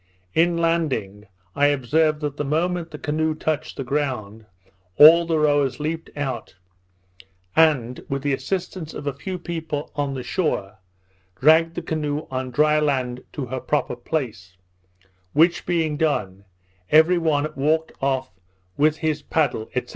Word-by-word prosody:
In 170 Hz, +1 st, +3 dB
landing, 135 Hz, -12 st, -1 dB, 0.3 s
I 145 Hz, -, +4 dB
observed 150 Hz, +3 st, +1 dB
that 145 Hz, -1 st, -3 dB
the -, -, -1 dB
moment 165 Hz, +4 st, -1 dB
the 150 Hz, -, -8 dB
canoe 155 Hz, +1 st, -1 dB
touched 155 Hz, -1 st, -3 dB
the 135 Hz, -, -3 dB
ground, 120 Hz, -6 st, -3 dB, 0.5 s
all 165 Hz, +3 st, +8 dB
the 165 Hz, -1 st, +1 dB
rowers 145 Hz, -3 st, +2 dB
leaped 160 Hz, +2 st, -3 dB
out, 130 Hz, -8 st, -4 dB, 1.0 s
and 135 Hz, -7 st, +3 dB
with 135 Hz, 0 st, -2 dB
the 145 Hz, -1 st, +1 dB
assistance 180 Hz, +1 st, -4 dB
of 145 Hz, -, -7 dB
a 140 Hz, -, -1 dB
few 185 Hz, +5 st, -5 dB
people 160 Hz, -4 st, -5 dB
on 140 Hz, -2 st, -2 dB
the 130 Hz, -, -5 dB
shore, 110 Hz, -, -2 dB, 0.6 s
dragged 165 Hz, +3 st, +5 dB
the -, -, -4 dB
canoe 150 Hz, -1 st, -2 dB
on 130 Hz, 0 st, -3 dB
dry 150 Hz, +4 st, +3 dB
land 130 Hz, -4 st, -1 dB
to 140 Hz, -, -4 dB
her 130 Hz, +1 st, -4 dB
proper 145 Hz, -1 st, -1 dB
place; 115 Hz, -, -4 dB, 0.8 s
which 170 Hz, +3 st, +3 dB
being 160 Hz, -4 st, 0 dB
done, 100 Hz, -, -1 dB, 0.4 s
every 160 Hz, +3 st, +5 dB
one 155 Hz, -3 st, +1 dB
walked 155 Hz, +4 st, +1 dB
off 130 Hz, -1 st, -1 dB, 0.5 s
with 150 Hz, +1 st, +3 dB
his 155 Hz, -2 st, -1 dB
paddle, 140 Hz, -8 st, -1 dB
&c. 125 Hz, -, 0 dB
150 Hz, 145 wpm, -23 LUFS, 130-160 Hz, 1.0 s, all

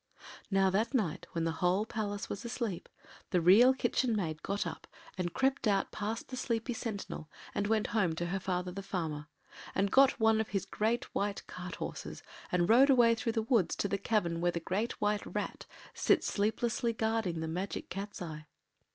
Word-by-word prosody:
Now 195 Hz, -1 st, +3 dB
that 225 Hz, +7 st, +1 dB
night, 195 Hz, -11 st, -1 dB
when 165 Hz, -, -1 dB
the 165 Hz, -, +1 dB
whole 185 Hz, +4 st, +3 dB
palace 210 Hz, -1 st, -3 dB
was 200 Hz, -, -5 dB
asleep, 235 Hz, -6 st, -3 dB, 0.4 s
the 180 Hz, -, +2 dB
Real 200 Hz, +10 st, +7 dB
Kitchen 255 Hz, -2 st, +1 dB
Maid 160 Hz, -7 st, -2 dB
got 200 Hz, +1 st, -2 dB
up -, -, -6 dB, 0.3 s
and 180 Hz, -2 st, -2 dB
crept 265 Hz, +1 st, +1 dB
out 200 Hz, -2 st, +2 dB
past 215 Hz, +2 st, -4 dB
the 260 Hz, -, -5 dB
sleepy 240 Hz, -1 st, -1 dB
sentinel 215 Hz, -9 st, -5 dB, 0.2 s
and 205 Hz, -, 0 dB
went 220 Hz, 0 st, +2 dB
home 190 Hz, -8 st, +2 dB
to 175 Hz, -, -2 dB
her 185 Hz, +3 st, -1 dB
father 180 Hz, -1 st, -2 dB
the 195 Hz, +2 st, -5 dB
farmer 160 Hz, -6 st, -3 dB, 0.5 s
and 195 Hz, +1 st, +1 dB
got 270 Hz, -1 st, +5 dB
one 220 Hz, 0 st, +4 dB
of 220 Hz, -, -3 dB
his 195 Hz, -3 st, -2 dB
great 225 Hz, +3 st, 0 dB
white 200 Hz, 0 st, -2 dB
cart 180 Hz, 0 st, -7 dB
horses -, -, -6 dB, 0.3 s
and 175 Hz, -1 st, +2 dB
rode 255 Hz, +6 st, +6 dB
away 240 Hz, -3 st, +6 dB
through 230 Hz, 0 st, -1 dB
the 225 Hz, -1 st, 0 dB
woods 225 Hz, -6 st, +2 dB
to -, -, -1 dB
the 200 Hz, 0 st, -1 dB
cavern 175 Hz, -6 st, 0 dB
where 175 Hz, 0 st, +3 dB
the 170 Hz, -, -2 dB
Great 195 Hz, +7 st, -2 dB
White 210 Hz, 0 st, +1 dB
Rat -, -, -4 dB, 0.3 s
sits -, -, +3 dB
sleeplessly 230 Hz, +3 st, 0 dB
guarding 220 Hz, -6 st, 0 dB
the 160 Hz, -, -3 dB
Magic 180 Hz, +5 st, -4 dB
Cat’s 195 Hz, 0 st, -5 dB
eye. 155 Hz, -2 st, -7 dB
205 Hz, 190 wpm, -32 LUFS, 180-225 Hz, 0.5 s, Real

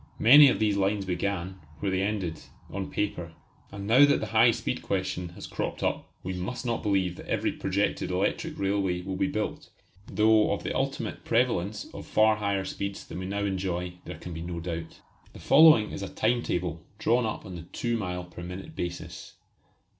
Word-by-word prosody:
Many 145 Hz, +5 st, +9 dB
of -, -, +1 dB
these 105 Hz, -2 st, +1 dB
lines 100 Hz, 0 st, +1 dB
began, 95 Hz, 0 st, -2 dB, 0.2 s
where 100 Hz, -, -1 dB
they 95 Hz, 0 st, +1 dB
ended, 95 Hz, -6 st, -2 dB, 0.3 s
on 95 Hz, 0 st, -4 dB
paper. 90 Hz, -5 st, -3 dB, 0.4 s
And 100 Hz, 0 st, -7 dB
now 120 Hz, +7 st, +6 dB
that 145 Hz, 0 st, +5 dB
the -, -, -3 dB
high 115 Hz, +2 st, +7 dB
speed 115 Hz, -, -2 dB
question 95 Hz, -2 st, -2 dB
has -, -, -8 dB
cropped -, -, -4 dB
up, -, -, -2 dB
we 95 Hz, -, -3 dB
must 95 Hz, +8 st, -4 dB
not 115 Hz, -1 st, -1 dB
believe 95 Hz, -4 st, 0 dB
that -, -, -10 dB
every -, -, 0 dB
projected 100 Hz, +1 st, -1 dB
electric 90 Hz, +1 st, -1 dB
railway 95 Hz, -2 st, 0 dB
will 95 Hz, 0 st, -4 dB
be 95 Hz, -, +1 dB
built, 105 Hz, +1 st, -3 dB, 0.4 s
though 110 Hz, 0 st, +4 dB
of -, -, -4 dB
the -, -, -3 dB
ultimate -, -, -2 dB
prevalence 110 Hz, -4 st, 0 dB
of -, -, -8 dB
far 110 Hz, 0 st, +4 dB
higher 100 Hz, -2 st, -1 dB
speeds 100 Hz, +1 st, -5 dB
than -, -, -7 dB
we 95 Hz, -, -4 dB
now 100 Hz, +1 st, -1 dB
enjoy 90 Hz, -2 st, -2 dB
there -, -, -7 dB
can 90 Hz, -, -8 dB
be 80 Hz, -, -6 dB
no 85 Hz, 0 st, -4 dB
doubt. 85 Hz, -1 st, -6 dB, 0.3 s
The -, -, -11 dB
following 155 Hz, -9 st, +6 dB
is -, -, -6 dB
a 100 Hz, -, -4 dB
time 120 Hz, +2 st, +1 dB
table 85 Hz, -6 st, -2 dB, 0.2 s
drawn 120 Hz, +1 st, +2 dB
up 110 Hz, -, -5 dB
on 95 Hz, -, -8 dB
the 85 Hz, -1 st, -8 dB
two 120 Hz, -1 st, -1 dB
mile 90 Hz, -5 st, -3 dB
per 90 Hz, 0 st, -11 dB
minute 90 Hz, -, -8 dB
basis. 85 Hz, 0 st, -6 dB
95 Hz, 195 wpm, -28 LUFS, 90-110 Hz, 0.4 s, Many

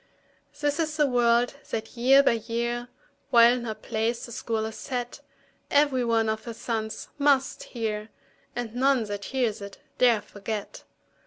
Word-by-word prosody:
This 290 Hz, +1 st, 0 dB
is 310 Hz, -1 st, -1 dB
the 300 Hz, -, +4 dB
word 240 Hz, -1 st, +3 dB, 0.2 s
that 220 Hz, +1 st, -4 dB
year 265 Hz, +4 st, +6 dB
by -, -, +4 dB
year, 235 Hz, +1 st, -2 dB, 0.4 s
While 235 Hz, -2 st, +7 dB
in 245 Hz, -1 st, -3 dB
her 220 Hz, -2 st, -3 dB
place 225 Hz, +2 st, -2 dB
the 235 Hz, -, -11 dB
School 225 Hz, -1 st, -2 dB
is 220 Hz, 0 st, -6 dB
set, 245 Hz, -3 st, -4 dB, 0.5 s
Every 285 Hz, -3 st, +3 dB
one 230 Hz, -1 st, +2 dB
of 220 Hz, 0 st, -2 dB
her 235 Hz, -2 st, -6 dB
sons 220 Hz, -2 st, -4 dB
must 280 Hz, -2 st, +2 dB
hear, 215 Hz, -2 st, -4 dB, 0.5 s
And 240 Hz, -2 st, -4 dB
none 260 Hz, 0 st, +3 dB
that 205 Hz, -1 st, -5 dB
hears 240 Hz, -6 st, -1 dB
it 200 Hz, 0 st, -8 dB, 0.2 s
dare 235 Hz, -4 st, +4 dB
forget. 205 Hz, 0 st, -6 dB
235 Hz, 160 wpm, -26 LUFS, 220-255 Hz, 0.5 s, While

